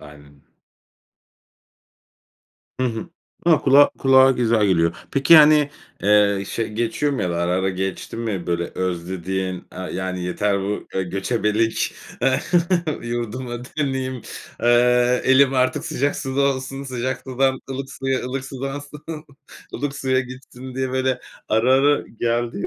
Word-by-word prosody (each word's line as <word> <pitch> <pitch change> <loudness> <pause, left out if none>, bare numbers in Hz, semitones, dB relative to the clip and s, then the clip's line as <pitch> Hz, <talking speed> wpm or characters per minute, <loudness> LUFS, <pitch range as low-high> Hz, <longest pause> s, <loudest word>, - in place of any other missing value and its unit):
Aynen 75 -1 -15 2.4
Hı 130 - +2
hı. 115 +9 -4 0.4
A, 160 -3 +5
kulağa 140 +1 +6
kulağa 135 0 +6
güzel 115 -4 +2
geliyor. 85 -2 +2
Peki 140 +4 +3
yani, 150 -2 +7 0.3
eee, 100 -1 +3
şey 115 - -3
geçiyor 120 +6 -1
mu 130 - -2
ya 90 - -1
da 85 - -2
ara 85 +1 0
ara 95 +1 +1
geçti 95 +2 -4
mi? 110 -6 -3
Böyle 85 0 0
özlediğin, 95 +1 -3 0.2
eee, - - -10 0.2
yani 95 -1 -3
yeter 100 +2 0
bu 100 +2 -4
göçebelik, 105 +4 -1 0.3
eee, 130 0 +3 0.6
yurduma 120 +1 -4
döneyim. 130 -3 -3 0.4
Eee, 125 +1 +4
elim 135 0 +5
artık 130 0 +1
sıcak 140 +3 -1
suda 135 +1 -2 0.2
olsun 135 +1 -6
sıcak 130 0 -3
sudan 130 0 0
ılık 135 +1 -5
suya 135 0 -1
ılık 130 +1 -4
sudan 135 +1 -5
su 150 +2 -9 0.5
ılık 140 -1 -3
suya 130 -1 +1
gitsin 130 0 -10
diye 130 0 -2
böyle 130 -1 0 0.3
ara 110 +4 +3
ara 145 +2 +4
geldiği 120 -1 -2
125 Hz, 135 wpm, -22 LUFS, 100-135 Hz, 2.4 s, yani